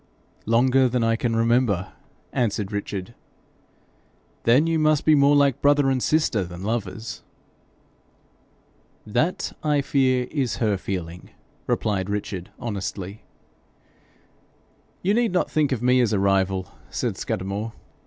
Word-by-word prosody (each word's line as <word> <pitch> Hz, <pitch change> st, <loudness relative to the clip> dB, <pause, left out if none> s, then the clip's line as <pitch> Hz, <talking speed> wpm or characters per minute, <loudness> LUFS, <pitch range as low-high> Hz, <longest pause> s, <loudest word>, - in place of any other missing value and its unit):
'Longer 130 Hz, +3 st, +4 dB
than 120 Hz, -1 st, 0 dB
I 115 Hz, 0 st, +2 dB
can 115 Hz, 0 st, -1 dB
remember,' 115 Hz, -5 st, +1 dB, 0.4 s
answered 105 Hz, -4 st, -1 dB
Richard. 100 Hz, 0 st, -4 dB, 1.3 s
'Then 125 Hz, +7 st, +5 dB
you 165 Hz, -1 st, +1 dB
must 155 Hz, -1 st, +2 dB
be 155 Hz, -, +6 dB
more 140 Hz, 0 st, +5 dB
like 140 Hz, -3 st, +3 dB
brother 145 Hz, -1 st, +4 dB
and 130 Hz, -1 st, 0 dB
sister 150 Hz, -10 st, +1 dB
than 90 Hz, +1 st, -8 dB
lovers.' 110 Hz, 0 st, -4 dB, 1.8 s
'That, 155 Hz, +12 st, -1 dB
I 150 Hz, -2 st, +2 dB
fear, 130 Hz, -2 st, +1 dB
is 135 Hz, -5 st, -1 dB
her 110 Hz, -3 st, +1 dB
feeling,' 90 Hz, -2 st, -5 dB, 0.4 s
replied 100 Hz, -2 st, 0 dB
Richard, 100 Hz, -3 st, -4 dB
honestly. 100 Hz, -3 st, -5 dB, 1.8 s
'You 195 Hz, +3 st, +2 dB
need 230 Hz, -3 st, +1 dB
not 180 Hz, -, 0 dB
think 150 Hz, -3 st, +1 dB
of 125 Hz, -3 st, -1 dB
me 125 Hz, 0 st, +4 dB
as 115 Hz, -3 st, +1 dB
a 100 Hz, -, +2 dB
rival,' 95 Hz, -1 st, +1 dB, 0.2 s
said -, -, -2 dB
Scudamore. 100 Hz, +4 st, -3 dB
115 Hz, 125 wpm, -24 LUFS, 100-140 Hz, 1.8 s, be